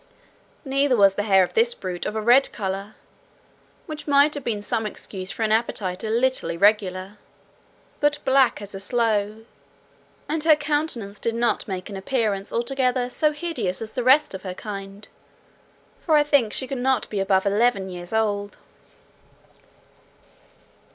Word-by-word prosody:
Neither 270 -1 +2
was 200 -2 +5
the 205 - -2
hair 190 -1 +6
of 180 - -4
this 475 +1 +2
brute 180 - -5
of 210 - -4
a 220 - -2
red 245 +4 +5
colour 195 0 -5 0.9
(which 310 -3 -8
might 285 +1 +4
have 290 - -4
been 210 -4 -3
some 220 +1 -1
excuse 190 -2 -8
for 225 - -3
an 215 - +1
appetite 210 -4 -1
a 220 - -3
little 255 +4 +1
irregular), 195 +1 +1 0.8
but 295 0 +2
black 265 -5 +3
as 205 - -10
a 195 - -6
sloe, 220 0 -1 0.8
and 310 0 -2
her 315 -1 +6
countenance 290 -9 -3
did 230 0 -2
not 235 0 0
make 185 -2 -5
an 205 - -8
appearance 200 -1 -2
altogether 250 0 0
so 305 +2 +2
hideous 300 - -3
as 220 -1 -7
the 250 - -3
rest 280 +3 +4
of 190 - -6
her 185 -2 -6
kind; 195 0 -8 1.0
for 315 - +3
I 295 - +5
think 285 -7 +2
she 260 - -2
could 260 0 -5
not 260 -1 +1
be 205 - -2
above 190 0 +2
eleven 200 -1 +2
years 175 -1 -8
old. 205 -2 -1
220 Hz, 160 wpm, -23 LUFS, 200-265 Hz, 1.0 s, hair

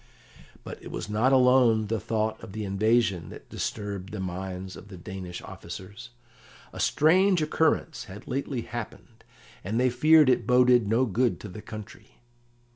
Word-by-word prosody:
But - - -9
it - - -9
was 105 - -5
not 115 +5 +2
alone 125 -4 +5
the 110 +1 -2
thought 110 +1 -2
of 95 - -9
the 110 -1 -4
invasion 100 -3 +1
that - - -12
disturbed 100 -2 -4
the 105 - -6
minds 95 0 -5
of 95 - -12
the 95 -3 -10
Danish 90 0 -7
officers. 100 +4 -9 0.6
A - - -8
strange 185 +4 +4
occurrence 160 +1 0
had 105 +3 -11
lately 135 -2 -2
happened, 115 0 -8 0.4
and 110 +5 -1
they 125 0 +3
feared 155 +4 +5
it 120 -3 +2
boded 125 -2 +5
no 115 +5 +2
good 120 +2 0
to - - -7
the 105 +2 -9
country. 110 -1 -11
110 Hz, 160 wpm, -27 LUFS, 100-125 Hz, 0.6 s, alone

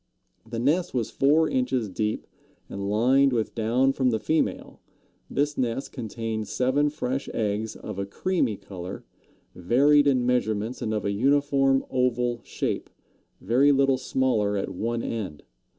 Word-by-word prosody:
The 115 - -4
nest 155 +7 +1
was 120 -3 -1
four 155 +4 +3
inches 125 -4 0
deep 105 +3 -2 0.4
and 100 0 -4
lined 130 +6 +4
with 115 -2 -1
down 120 +4 +2
from 130 -2 +1
the 110 -2 0
female. 160 +8 -1 0.5
This 145 0 -1
nest 125 +1 -2
contained 110 -3 -4
seven 130 +7 +1
fresh 135 -2 -3
eggs 110 0 -1
of 105 -2 -7
a 100 - -3
creamy 130 - -1
color, 95 -2 -8 0.5
varied 145 +10 +4
in 130 -3 +2
measurements 115 -2 0
and 110 - -2
of 105 -3 -2
a 100 - +1
uniform 135 +3 +2
oval 125 -2 0
shape, - - -3 0.5
very 130 +8 +4
little 135 -1 +3
smaller 110 -6 0
at 95 - -2
one 115 +5 -2
end. 95 -10 -4
125 Hz, 145 wpm, -26 LUFS, 110-135 Hz, 0.5 s, lined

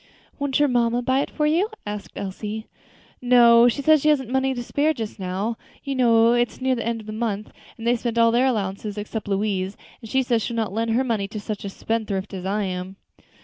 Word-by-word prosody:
"Won't 280 -2 0
your 295 - +4
mamma 240 -1 +1
buy 260 +2 +2
it - - -1
for 300 - -1
you?" 340 +8 +2 0.2
asked 210 -1 -6
Elsie. 210 +3 -5 0.6
"No, 240 -1 +6
she 275 +4 0
says 310 0 +5
she 305 - +3
hasn't 265 -5 +2
the - - -5
money 265 0 +1
to 245 - -4
spare 300 +5 +1
just 220 -3 -6
now. 195 +5 -2 0.3
You 275 - -3
know 235 -2 +4
it's 240 0 0
near 260 0 +1
the 235 - -2
end 230 -1 -2
of - - -14
the 215 - -6
month, 215 -2 -3 0.3
and 225 - -8
they've 240 - +4
all 235 - -1
spent - - -9
their 235 +2 +4
allowances 205 -3 -2
except 210 +1 -5
Louise, 195 -1 -1 0.2
and 225 - -10
she 265 +3 +2
says 240 -2 +1
she'll 235 +3 -3
not 220 -4 -1
lend 225 +2 -1
her 235 +4 +2
money 220 -6 -1
to 215 +1 -6
such 210 0 -5
a 200 - -4
spendthrift 205 -2 -3
as 190 -1 -5
I 205 +2 0
am." 185 0 -4
230 Hz, 230 wpm, -23 LUFS, 210-250 Hz, 0.6 s, No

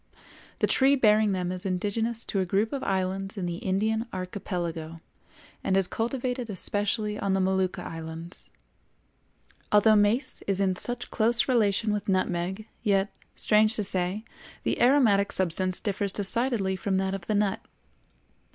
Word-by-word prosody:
The - - +2
tree 270 +1 +4
bearing 215 -4 +4
them 180 -2 -1
is 185 0 -4
indigenous 215 +5 -2
to 195 - -2
a - - +2
group 200 +6 0
of 275 - -2
islands 195 +2 -2
in 185 - -2
the 170 -1 -3
Indian 220 +5 -1
Archipelago 175 -3 -5 0.6
and 190 - +1
is 195 - +4
cultivated 245 +1 -3
especially 210 +2 +1
on 195 - 0
the 195 - +2
Molucca 190 -1 0
islands. 165 +2 -8 1.2
Although 215 +1 +5
mace 210 +6 +2
is 195 -1 0
in 190 -2 +1
such 245 +5 -5
close 235 +2 +2
relation 215 -3 +2
with 205 -1 -3
nutmeg, 185 +2 -1 0.2
yet, 200 -2 +1 0.2
strange 215 +1 +3
to 215 - 0
say, 190 +3 -1 0.4
the - - -1
aromatic 235 -7 +4
substance 185 0 +1
differs 200 -1 -2
decidedly 205 -1 0
from 190 0 -1
that 190 0 -1
of 195 -3 -6
the 215 - 0
nut. 205 -1 0
200 Hz, 150 wpm, -27 LUFS, 185-220 Hz, 1.2 s, Although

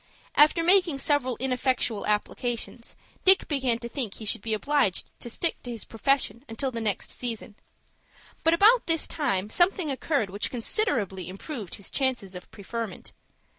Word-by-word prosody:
After 305 +3 +5
making 355 -4 +4
several 270 -3 0
ineffectual 255 -3 0
applications, 230 +3 -2 0.3
Dick 380 0 +7
began 260 -5 +1
to 235 0 -7
think 235 -5 -3
he 220 - -8
should 205 - -1
be 220 0 -1
obliged 275 -5 +1
to 240 - -6
stick 330 +8 -2
to 245 - -9
his 230 -2 -6
profession 250 +1 0
until 260 +4 -2
the 230 -1 -4
next 210 -3 -2
season. 230 -4 -5 0.9
But 325 +1 +4
about 445 +7 +5
this 325 -1 +3
time 195 - -1
something 350 -2 +2
occurred 265 - -1
which 200 +2 -2
considerably 225 - -1
improved 205 - -7
his 200 - -9
chances 250 -8 0
of 180 0 -10
preferment. 225 0 -6
245 Hz, 155 wpm, -27 LUFS, 215-290 Hz, 0.9 s, Dick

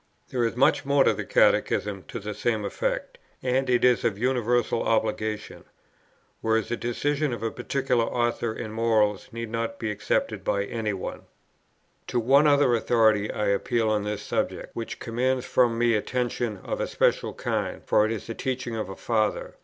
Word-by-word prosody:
There 125 -2 0
is 115 0 0
much 135 +4 +3
more 140 0 +3
in - - +3
the - - -4
Catechism - - +2
to - - -6
the - - -5
same - - -1
effect, - - -3 0.2
and 130 +1 +1
it 125 0 +3
is 125 -1 +4
of 110 -4 0
universal 120 0 +1
obligation; 110 -1 -1 0.8
whereas 110 0 +1
the 120 - 0
decision 145 +5 -1
of 115 -2 -5
a 115 - -1
particular 125 -1 0
author 120 -1 -1
in 110 0 -6
morals 110 -3 +1
need 115 -1 -6
not 115 0 -2
be 110 -2 -2
accepted 105 0 -1
by 100 - 0
any 110 +1 -2
one. 95 - -6 0.8
To 120 - 0
one 140 +6 +5
other 145 -4 +4
authority 110 -3 +3
I 105 - -1
appeal 110 +2 +1
on 105 -1 +1
this 105 0 -3
subject, - - -3
which 115 - -5
commands 125 +2 -1
from 120 -2 +2
me 120 0 +3
attention 120 0 -1
of - - -3
a - - -1
special - - +1
kind, - - -3
for 105 - +4
it 110 - 0
is 110 -3 -4
the 115 - -5
teaching 125 -1 -3
of 110 -3 -3
a 95 - -6
Father. 110 -3 -1
115 Hz, 180 wpm, -26 LUFS, 110-125 Hz, 0.8 s, one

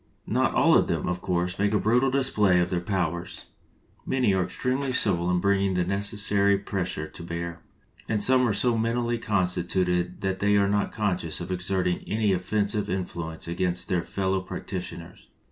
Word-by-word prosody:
Not - - +1
all - - +5
of - - +4
them, - - -1
of 90 0 -2
course, 90 0 -1
make 100 +1 +2
a 105 - +3
brutal 125 +6 +3
display 105 -9 +3
of 90 0 0
their 90 -1 0
powers. 85 -2 -3 0.6
Many 125 -6 +1
are 95 -1 +2
extremely 130 +9 -2
subtle 90 -8 +1
in 90 0 +2
bringing 100 0 +1
the 90 - +2
necessary 100 +1 +2
pres 95 -2 -3
sure 80 -3 -4
to 80 - -11
bear, 85 0 -5 0.5
and 110 - +1
some 130 +2 +5
are 115 +3 +1
mentally 120 +1 0
so - - -10
consti 90 -3 +1
tuted 90 -1 0
that 95 -1 -1
they 105 0 +3
are 100 0 +3
not 100 0 0
conscious 90 -6 -2
of 90 +1 -6
exerting 90 -1 0
any 105 -2 +1
offensive 100 +3 -1
influence 85 -3 -4
against 90 +1 -1
their 90 -2 +1
fellow 95 +2 -1
practi - - -5
tioners. - - -10
95 Hz, 180 wpm, -26 LUFS, 90-105 Hz, 0.6 s, all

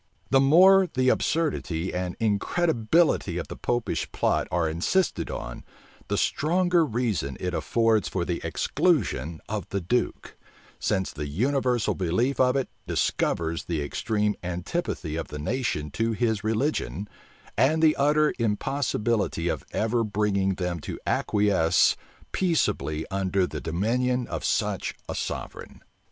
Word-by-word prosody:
The 135 - +6
more 185 +7 +6
the 130 0 +2
absurdity 110 - 0
and 90 0 -3
incredibility 115 - +1
of 85 - -4
the - - -6
Popish 120 -1 -2
plot - - +1
are 85 -1 +1
insisted 90 - 0
on, - - -6 0.4
the - - -1
stronger 175 +2 +2
reason 110 - -1
it 90 0 -3
affords 110 +7 +1
for 90 -2 -2
the 85 -1 -2
exclusion 85 - 0
of 105 -4 -4
the 100 - -1
duke; 95 +8 -2 0.4
since 95 -1 -1
the 75 0 -4
universal 125 - +1
belief 100 +10 0
of 125 0 +4
it 135 -2 0 0.2
discovers 85 0 0
the 80 -4 -2
extreme 105 +7 0
antipathy 90 - -3
of 80 - -4
the 75 - -7
nation 75 - -2
to 115 +5 0
his 110 -1 0
religion, 110 -2 -1 0.5
and 155 +4 +3
the 155 -1 +5
utter 150 +2 +3
impossibility 110 -5 0
of - - -2
ever 115 +2 +1
bringing 100 -2 0
them 90 -2 -2
to - - -6
acquiesce 100 -5 +3 0.4
peaceably 115 - 0
under 95 -1 +1
the 75 -2 -6
dominion 120 +9 0
of - - -5
such - - -1
a - - -3
sovereign. - - -6
105 Hz, 135 wpm, -26 LUFS, 85-130 Hz, 0.5 s, The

